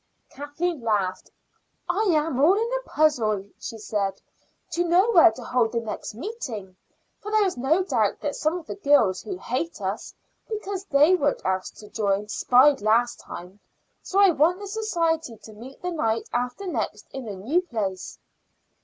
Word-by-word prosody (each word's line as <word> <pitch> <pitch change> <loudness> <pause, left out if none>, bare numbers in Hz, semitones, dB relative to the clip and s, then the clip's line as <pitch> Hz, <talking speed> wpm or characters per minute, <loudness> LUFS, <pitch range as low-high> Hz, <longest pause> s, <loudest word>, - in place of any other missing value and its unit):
Kathleen 290 +2 -3
laughed. 200 -5 -1 0.6
"I 355 +4 0
am 310 -5 +1
all 325 +8 +6
in 455 +3 -1
a - - -3
puzzle," 225 -10 +2
she 225 - -6
said, 205 -2 -2 0.5
"to 345 +2 +1
know 360 +6 +3
where 345 - +8
to - - -9
hold 240 -2 +1
the 235 - +1
next 220 -2 -6
meeting, 235 - -6 0.4
for 420 - -7
there 430 -1 +3
is 375 - -1
no 285 +9 +2
doubt 220 - 0
that 290 - -2
some 310 +3 0
of 340 - -9
the - - -5
girls 280 - +3
who 380 - -6
hate 320 +1 -3
us 195 +1 -4 0.3
because 400 -3 -4
they 295 +1 +5
weren't 290 -6 +1
asked 185 0 -2
to 210 - -12
join 205 -1 -1
spied 265 +6 +4
last 230 +3 +2
time; 180 +4 -10 0.4
so 390 - -1
I 395 -2 +7
want 330 +4 +3
the 405 - -7
society 335 - -1
to 220 - -13
meet 245 +6 -12
the 360 - -2
night 225 -9 -1
after 250 +10 -2
next 225 - -3
in 265 -3 -7
a 205 - -5
new 255 - 0
place." 210 - -4
280 Hz, 175 wpm, -25 LUFS, 220-355 Hz, 0.6 s, where